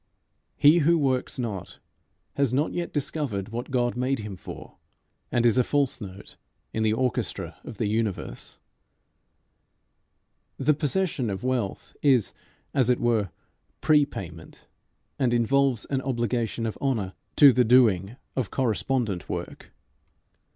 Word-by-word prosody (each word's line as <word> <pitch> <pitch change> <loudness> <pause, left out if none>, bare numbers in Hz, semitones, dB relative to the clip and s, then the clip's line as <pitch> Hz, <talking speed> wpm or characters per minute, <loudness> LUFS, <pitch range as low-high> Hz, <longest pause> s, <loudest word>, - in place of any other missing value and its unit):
He 150 +4 +6
who 165 +2 +4
works 130 -4 0
not 110 -7 -5 0.6
has 140 -4 +1
not 140 +5 0
yet 175 -1 -3
discovered 135 -9 -2
what 120 +2 -5
God 120 -2 0
made 130 +2 0
him 105 -3 -6
for, - - -10 0.5
and 120 0 +2
is 120 +1 +4
a - - +5
false 140 -1 0
note 100 -1 -10 0.4
in 110 - -1
the 110 -1 +3
orchestra 125 +1 -2
of 110 - -9
the 110 - -1
universe. 105 - -3 2.0
The 150 +3 +3
possession 150 - -1
of 95 +3 -4
wealth 125 -6 -2
is 130 -7 +3 0.4
as 130 -3 +3
it 125 - +3
were 115 -5 +1 0.5
pre 150 -1 +5
payment, 85 - -9 0.5
and 125 -3 +2
involves 130 0 +2
an 135 -2 -1
obligation 120 -3 -1
of 110 - -4
honour 110 -9 -1 0.2
to 140 -3 +8
the 125 - +4
doing 110 -4 +4 0.2
of 125 -7 -1
correspondent 120 -5 -1
work. - - -6
125 Hz, 135 wpm, -26 LUFS, 110-135 Hz, 2.0 s, to